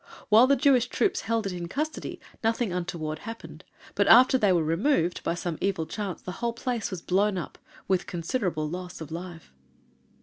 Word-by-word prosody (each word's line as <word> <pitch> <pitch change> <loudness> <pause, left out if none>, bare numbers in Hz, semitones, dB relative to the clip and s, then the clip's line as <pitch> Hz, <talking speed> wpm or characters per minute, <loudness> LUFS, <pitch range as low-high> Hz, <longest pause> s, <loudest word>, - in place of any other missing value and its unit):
While 225 +4 +7
the 280 - +5
Jewish 265 -4 +3
troops 390 - 0
held 225 -1 -1
it 195 - -2
in 175 -1 -5
custody 305 - -4 0.2
nothing 225 -3 0
untoward 160 -3 -3
happened, 225 +6 -9 0.3
but, - - +1
after 255 +3 +7
they 210 -7 +3
were 170 -3 +3
removed, 175 - +1
by - - -1
some 170 -2 -4
evil 190 -5 0
chance 200 0 -5
the 180 - -5
whole 235 -1 0
place 235 -2 -3
was 185 -4 -6
blown 195 +2 +1
up 175 - -6 0.3
with 190 -2 +1
considerable 170 -3 -2
loss 180 +3 -6
of 160 -1 -8
life. 170 - -8
190 Hz, 180 wpm, -27 LUFS, 170-235 Hz, 0.3 s, While